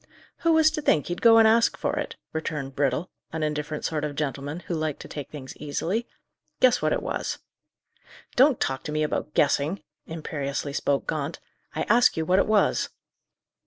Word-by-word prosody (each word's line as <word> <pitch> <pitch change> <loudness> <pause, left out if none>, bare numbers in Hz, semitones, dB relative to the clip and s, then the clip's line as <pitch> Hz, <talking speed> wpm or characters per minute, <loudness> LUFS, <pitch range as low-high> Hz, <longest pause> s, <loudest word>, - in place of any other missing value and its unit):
"Who 335 -1 +2
was 320 -1 +5
to 305 - -3
think 155 - +2
he'd 175 - -4
go 230 -1 +7
and 225 -1 +7
ask 230 +1 +4
for - - -1
it?" - - -3 0.2
returned 150 -4 -4
Brittle, 140 +5 0 0.2
an 160 -1 -3
indifferent 150 0 -2
sort 155 -2 -1
of 150 -1 -3
gentleman, 145 +2 -3
who 180 - -5
liked 155 -3 -2
to - - -9
take 145 -2 -7
things 135 -3 -9
easily. 180 +10 -2 0.5
"Guess 250 -1 +4
what - - +1
it - - 0
was." - - -3 1.0
"Don't 265 0 +5
talk 135 0 -1
to - - -3
me 155 0 0
about 150 0 -3
guessing!" 150 +4 +2 0.2
imperiously 145 -3 -4
spoke 140 -1 0
Gaunt. 155 0 -3 0.4
"I - - 0
ask 240 -1 +4
you 160 - 0
what 185 +3 +3
it - - +2
was?" 215 -1 +2
155 Hz, 185 wpm, -26 LUFS, 145-210 Hz, 1.0 s, go